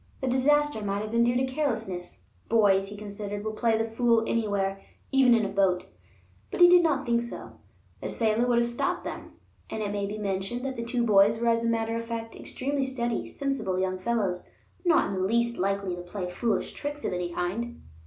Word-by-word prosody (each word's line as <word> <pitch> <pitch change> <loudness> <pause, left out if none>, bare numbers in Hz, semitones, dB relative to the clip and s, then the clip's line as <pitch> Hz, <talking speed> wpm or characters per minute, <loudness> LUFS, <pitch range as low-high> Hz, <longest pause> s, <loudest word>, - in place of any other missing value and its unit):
The 265 - -2
disaster 295 0 +2
might 200 0 -1
have 215 - -6
been 235 0 +3
due 240 +1 +2
to 260 - +2
carelessness; 225 -10 -3 0.3
boys, 200 -4 +4
he 205 +1 -9
considered, 205 0 -6
will 215 - -1
play 225 0 +2
the 225 - 0
fool 230 0 +2
anywhere, 200 -4 -1 0.3
even 265 -3 +6
in 220 -2 +2
a - - -2
boat; 195 -2 +1 0.6
but - - -5
he 350 - +10
did 355 0 +7
not 285 -5 +1
think 235 -1 +2
so; 235 - -8 0.4
the - - -4
sailor 225 +1 +1
would 240 -1 +3
have 235 0 +3
stopped 235 0 -1
them. - - -7 0.4
And, 220 - -3
it 205 - -2
may 200 -1 -2
be 210 +1 -5
mentioned, 205 +5 -3
that 265 -1 -3
the 235 - -4
two 240 0 0
boys 205 0 +5
were 235 0 +2
as 230 0 +2
a 230 - +1
matter 225 0 0
of 230 - -2
fact 230 -1 -5
extremely 275 +1 -2
steady, 240 -3 -2
sensible 275 -10 -2
young 185 0 -1
fellows, 195 -4 -1 0.3
not 345 -2 +4
in - - -3
the 185 -1 -1
least 235 +2 +1
likely 195 -1 0
to 175 - -7
play 180 0 -5
foolish 225 +4 -1
tricks 290 0 -5
of - - -1
any 180 -1 -2
kind. 215 +8 -3
225 Hz, 215 wpm, -27 LUFS, 200-240 Hz, 0.6 s, he